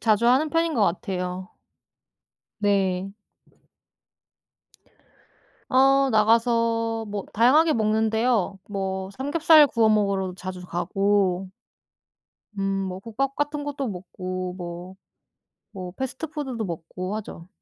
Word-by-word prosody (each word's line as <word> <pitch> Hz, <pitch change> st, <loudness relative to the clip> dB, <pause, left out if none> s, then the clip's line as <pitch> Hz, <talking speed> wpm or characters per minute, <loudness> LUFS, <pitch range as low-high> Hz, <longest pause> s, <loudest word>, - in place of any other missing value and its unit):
자주 220 Hz, 0 st, +2 dB
하는 265 Hz, +6 st, +4 dB
편인 330 Hz, 0 st, +1 dB
것 220 Hz, -, +2 dB
같아요. 180 Hz, 0 st, -2 dB, 1.1 s
네. 195 Hz, -2 st, 0 dB, 2.5 s
어. 270 Hz, +1 st, +4 dB
나가서 230 Hz, +1 st, +2 dB
뭐 205 Hz, -1 st, -5 dB
다양하게 295 Hz, +8 st, +5 dB
먹는데요. 220 Hz, -2 st, +1 dB
뭐 190 Hz, -1 st, -3 dB
삼겹살 300 Hz, +5 st, +5 dB
구워 230 Hz, -5 st, +2 dB
먹으러도 200 Hz, -3 st, +1 dB
자주 185 Hz, 0 st, -7 dB
가고 190 Hz, +1 st, 0 dB, 1.1 s
음 -, -, -1 dB, 0.3 s
뭐 185 Hz, -, -5 dB
국밥 255 Hz, +6 st, -3 dB
같은 290 Hz, 0 st, -2 dB
것도 280 Hz, -3 st, -3 dB
먹고 185 Hz, -1 st, -5 dB
뭐, 175 Hz, +1 st, -7 dB, 0.8 s
뭐 185 Hz, -3 st, -7 dB
패스트푸드도 265 Hz, -2 st, -4 dB
먹고 185 Hz, +3 st, -5 dB
하죠. 180 Hz, -5 st, -9 dB
215 Hz, 205 characters per minute, -24 LUFS, 185-255 Hz, 2.5 s, 다양하게